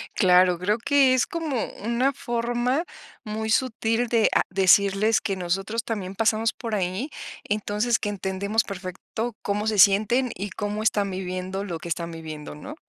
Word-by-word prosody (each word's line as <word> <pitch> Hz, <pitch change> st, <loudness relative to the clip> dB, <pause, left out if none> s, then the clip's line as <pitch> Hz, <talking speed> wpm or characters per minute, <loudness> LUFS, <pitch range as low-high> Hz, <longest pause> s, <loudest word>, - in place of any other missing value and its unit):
Claro, 180 Hz, -2 st, +4 dB
creo 205 Hz, +4 st, +1 dB
que 265 Hz, +1 st, +4 dB
es 250 Hz, -, +2 dB
como 310 Hz, -8 st, -2 dB, 0.2 s
una 245 Hz, +5 st, +1 dB
forma 240 Hz, +4 st, -1 dB, 0.4 s
muy 220 Hz, 0 st, -4 dB
sutil 230 Hz, -1 st, +1 dB
de 225 Hz, -2 st, +3 dB
a -, -, +4 dB
decirles 195 Hz, +3 st, +4 dB
que 195 Hz, -, -2 dB
nosotros 195 Hz, +5 st, -2 dB
también 195 Hz, -5 st, -4 dB
pasamos 225 Hz, +1 st, +1 dB
por 230 Hz, -3 st, -4 dB
ahí, 190 Hz, -, -2 dB, 0.4 s
entonces, 210 Hz, +3 st, 0 dB
que 205 Hz, -, -3 dB
entendemos 200 Hz, +2 st, -1 dB
perfecto 200 Hz, +4 st, -5 dB
cómo 205 Hz, +1 st, -1 dB
se 215 Hz, -2 st, 0 dB
sienten 220 Hz, +6 st, +4 dB
y 200 Hz, +2 st, -5 dB
cómo 210 Hz, +1 st, -3 dB
están 205 Hz, -2 st, +1 dB
viviendo 185 Hz, +1 st, -4 dB
lo 170 Hz, -5 st, -5 dB
que 170 Hz, -, -8 dB
están 170 Hz, 0 st, -3 dB
viviendo, 155 Hz, -2 st, -8 dB
¿no? 285 Hz, -, -9 dB
210 Hz, 160 wpm, -25 LUFS, 190-230 Hz, 0.4 s, Claro